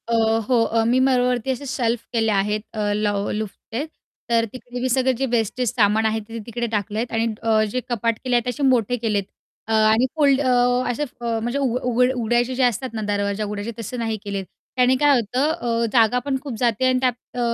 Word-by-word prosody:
अ, 235 - -1 0.3
हो 245 -3 +3
अ, 225 0 +1
मी 245 +3 +3
माळावरती 250 -1 +2
असे 260 +2 -4
शेल्फ 240 -3 0
केले 225 -2 +2
आहेत, 210 +1 +1
अ, 210 -2 -1
ल 210 0 0 0.3
लाॅफ्टचे 220 +5 -5 0.4
तर 230 -1 +3
तिकडे 245 -1 -8
मी 260 - 0
सगळे 260 +1 +2
जे 260 +2 -1
वेस्टेज 240 +1 0
सामान 220 -1 +3
आहे 220 0 +1
ते 230 0 -6
तिकडे 235 0 -3
टाकले 210 0 -2
आहेत, 235 +1 -3
आणि 225 0 +1 0.2
अ, 220 -1 +3
जे 255 - -1
कपाट 230 -1 0
केले 250 -2 +1
आहेत. 240 - +3
ते - - -1
असे 265 +4 -3
मोठे 245 -3 +3
केले 220 -3 0
आहेत 195 -1 -3 0.4
अ, 225 - -1 0.2
आणि 225 +3 +3
फुल्ड 285 -3 +3
अ, 260 -3 +2 0.4
असे 270 +5 -2 0.2
म्हणजे 235 +2 -1
अ, - - -1
उघड 250 -2 0
उघड 250 +1 +3
उघडायचे 240 +1 0
जे 260 - +1
असतात 245 +1 +1
ना, 220 - -3
दरवाजे 205 0 -1
उघडायचे, 210 +2 -4
तसं 230 +3 -5
नाही 225 -1 -1
केलेत. 200 -1 -4 0.3
त्याने 255 0 +4
काय 290 -1 +5
होतं? 250 +7 0
अ, 235 -7 -1
जागा 235 0 +4
पण 275 -2 0
खूप 275 -3 -6
जाते, 240 0 +1
आणि 255 0 +3
त्यात, 255 -1 +2 0.2
अ, 245 - -5
235 Hz, 220 wpm, -22 LUFS, 220-255 Hz, 0.4 s, काय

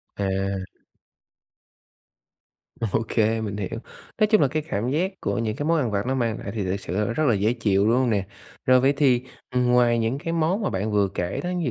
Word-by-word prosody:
À. 100 - -2 2.6
OK, 115 +1 -2 0.3
mình 100 -1 -4
hiểu. 105 +3 -4 0.4
Nói 215 - +5
chung 215 -1 +4
là 145 - +5
cái 155 +2 -2
cảm 110 +5 -1
giác 180 +7 0
của - - -1
những 110 -2 -1
cái 145 - -3
món 165 0 +3
ăn 125 -7 0
vặt 100 +1 -1
nó 130 +1 0
mang 115 -3 -1
lại - - -6
thì 105 -3 -2
thực 95 +2 -1
sự, 90 -1 -5
ơ, 105 +3 0
rất 155 - 0
là 120 - +4
dễ 105 +4 +1
chịu, 105 -4 +1
đúng 115 - +4
hông 130 -2 +2
nè? 100 -3 0 0.4
Rồi 130 0 +6
vậy 135 +2 +3
thì, 130 -4 +3 0.3
ừm, 125 -1 +1
ngoài 120 -1 +4
những 115 +4 0
cái 165 +3 -3
món 170 +6 +1
mà 200 - 0
bạn 100 +3 -2
vừa 100 -1 +3
kể 90 -1 -2
đó, 180 - -2
ví 165 - -1
120 Hz, 225 wpm, -24 LUFS, 105-140 Hz, 2.6 s, Rồi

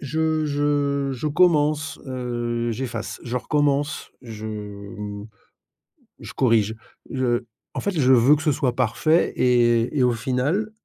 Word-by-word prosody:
Je 155 +2 0
je 145 -1 0
je 130 +3 -4
commence, 150 -2 +2
heu, 120 -2 -2
j'efface, 115 -2 -5
je 120 0 -3
recommence, 145 +2 0
je, 110 -3 -8
mmh, 105 -1 -7 0.9
je - - -9
corrige, 110 -4 +2 0.4
je 125 -2 0 0.3
en - - -2
fait, 200 - -1
je 130 -2 +4
veux 130 +3 +6
que 150 - -6
ce 155 - +2
soit 135 -4 0
parfait 130 +7 +2
et 120 +1 +3
et - - +3
au 125 -1 +4
final, 130 - -1
130 Hz, 140 wpm, -23 LUFS, 120-145 Hz, 0.9 s, veux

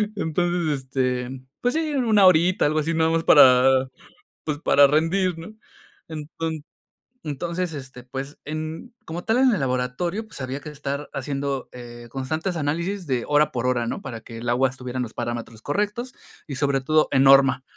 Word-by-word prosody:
Entonces, 170 -4 0
este, 125 -1 -1 0.3
pues 245 +1 +1
sí, 315 -2 -1
1 220 -6 +4
horita, 180 0 +4
algo 155 +1 +1
así 165 +2 -1
nada 160 0 +2
más 165 0 +1
para, 130 -3 +6 0.5
pues 150 -2 -2
para 145 -3 +5
rendir, 165 +4 +1
¿no? 185 +6 -9 0.6
Enton 160 0 -5 0.6
entonces, 170 +4 -3
este, 130 -3 -8
pues 135 +3 -7
en 155 +9 -6
como 170 +2 -6
tal 225 +2 +1
en 260 -2 +5
el 185 - -2
laboratorio, 135 - -2
pues 215 - -11
había 130 +2 -4
que 150 - -8
estar 140 0 -5
haciendo, 140 0 -3
eh, 120 -1 -10
constantes 155 +8 -3
análisis 170 +5 -2
de 130 -3 0
hora 150 0 +3
por 120 0 -2
hora, 120 -2 0
¿no? - - -4
Para 115 -4 -7
que 115 0 -10
el 120 +1 -6
agua 130 +2 +3
estuviera 130 -1 -8
en 125 - 0
los 110 - -10
parámetros 120 -2 -5
correctos 210 - -2 0.3
y 140 - -5
sobre 140 -1 +1
todo 155 +3 +3
en 135 - +4
norma. 135 -1 +6
145 Hz, 175 wpm, -23 LUFS, 130-170 Hz, 0.6 s, para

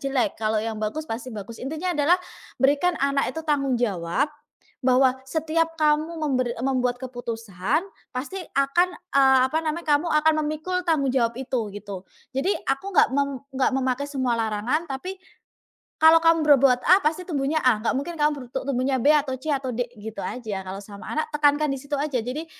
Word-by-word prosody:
jelek, 270 -4 -1
kalau 215 0 +1
yang 220 0 -3
bagus, 215 +9 -3
pasti 240 -2 -5
bagus." 220 0 -8
Intinya 315 +7 -2
adalah 310 +2 +3 0.4
berikan 290 +6 +2
anak 280 0 +1
itu 320 - -4
tanggung 275 -4 +1
jawab. 215 - -1 0.5
Bahwa 255 0 +4
setiap 325 +2 0
kamu 310 +2 +2
memberi 255 -4 0
membuat 250 -2 0
keputusan 230 - -2 0.3
pasti 260 +9 -4 0.2
akan, 275 +6 +3 0.3
eee, 265 -1 +6
apa 315 - 0
namanya, 320 +2 -3
kamu 305 +4 -4
akan 305 +1 +4
memikul 310 +5 -3
tanggung 310 -4 +2
jawab 235 -3 +1
itu, 250 -5 -2
gitu. 200 -2 -7 0.3
Jadi 275 +8 +1 0.2
aku 275 +9 -1
nggak - - +5
mem 280 -1 0 0.2
nggak 260 0 +2
memakai 260 +1 -1
semua 260 -4 0
larangan, 225 +7 0
tapi 365 +9 -5 0.8
kalau 320 +1 +8
kamu 330 0 +4
berbuat 270 -4 +5
A 375 +2 +6
pasti 320 +4 +1
tumbuhnya 300 -1 0
A, 250 -4 +5
nggak 225 - 0
mungkin 335 +5 -4
kamu 300 0 +4
berutuk 250 -2 -5
tumbuhnya 260 0 +1
B 295 +5 +5
atau 275 -3 +1
C 305 +5 -7
atau 270 -2 -2
D, 245 +1 -1
gitu 220 +1 -7
aja 215 -6 -4
kalau 190 +1 -6
sama 200 0 -11
anak, 310 0 -1
tekankan 295 0 +3
di - - -3
situ 285 +1 -9
aja. 290 -3 -1
Jadi 255 +8 -4
270 Hz, 180 wpm, -24 LUFS, 245-305 Hz, 0.8 s, kalau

